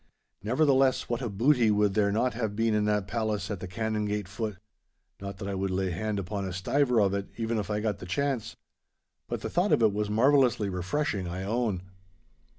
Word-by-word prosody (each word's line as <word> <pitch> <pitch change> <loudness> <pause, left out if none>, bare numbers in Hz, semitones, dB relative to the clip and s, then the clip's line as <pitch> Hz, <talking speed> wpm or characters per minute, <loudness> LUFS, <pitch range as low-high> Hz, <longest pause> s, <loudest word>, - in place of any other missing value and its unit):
Nevertheless, 130 +3 +2
what 120 +1 -1
a 120 - -2
booty 120 +3 +3
would 105 -1 +3
there 100 0 +2
not 120 +5 +1
have 110 -3 -2
been 115 0 +1
in 105 0 +2
that 105 -2 +1
palace 110 -1 -2
at 100 - -3
the 95 - -6
Canongate 105 -1 -2
foot! 105 0 -4 0.6
Not 100 -1 -6
that 100 -1 -6
I 100 - -2
would 95 0 -1
lay 95 0 -1
hand 105 +5 -2
upon 100 +1 -3
a 90 - -5
stiver 125 +7 +2
of 100 -2 +3
it, 100 0 -2
even 115 -1 -1
if 105 - -4
I 105 0 -1
got 105 -2 -1
the 90 - -8
chance, 135 +4 -1 0.7
but - - -4
the - - -3
thought 180 +4 +1
of 115 - +4
it 110 -2 +4
was 105 0 -1
marvellously 120 -2 +3
refreshing, 95 +2 -2
I 90 +2 -4
own. 105 -3 -1
105 Hz, 205 wpm, -28 LUFS, 100-115 Hz, 0.7 s, of